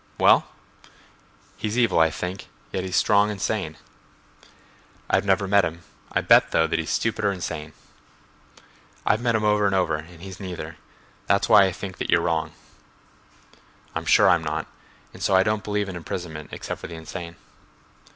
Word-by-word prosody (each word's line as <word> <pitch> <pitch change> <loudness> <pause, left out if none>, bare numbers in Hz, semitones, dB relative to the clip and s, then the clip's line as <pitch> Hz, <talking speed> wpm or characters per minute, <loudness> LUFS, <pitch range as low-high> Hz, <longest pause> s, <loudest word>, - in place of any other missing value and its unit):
"Well?" - - +5 1.1
"He's 110 +2 -3
evil, 120 -8 +3
I 80 0 +5
think, 90 +5 -5 0.2
yet 95 - -2
he's 95 -1 -3
strong 105 +2 +4
and 105 -2 -5
sane." 95 -6 -2 1.3
"I've - - +2
never 95 0 +2
met 100 0 +4
him. 85 +1 -4 0.3
I'll - - 0
bet, - - +6
though, 80 - +3
that 80 - -1
he's 80 - -3
stupid 110 -1 -1
or 100 - +3
insane." 80 -4 -5 1.3
"I've 110 - +2
met 120 -2 +1
him 110 - 0
over 105 -1 +3
and 100 - +1
over 85 -5 +1
and 80 +2 -12
he's 95 -1 -9
neither. 85 -4 -7 0.5
That's 100 - +2
why 100 - +7
I 95 - 0
think 95 +1 -7
you're - - +2
wrong." 85 -2 -1 1.4
"I'm - - -4
sure - - +5
I'm 85 -1 +4
not—and 75 0 -8
so 95 - +2
I 95 - +6
don't 105 +1 -1
believe 105 -1 -1
in 95 - -6
imprisonment 80 -3 -6
except - - -6
for - - -6
the 85 - -8
insane." 85 +1 -8
95 Hz, 170 wpm, -24 LUFS, 80-100 Hz, 1.4 s, why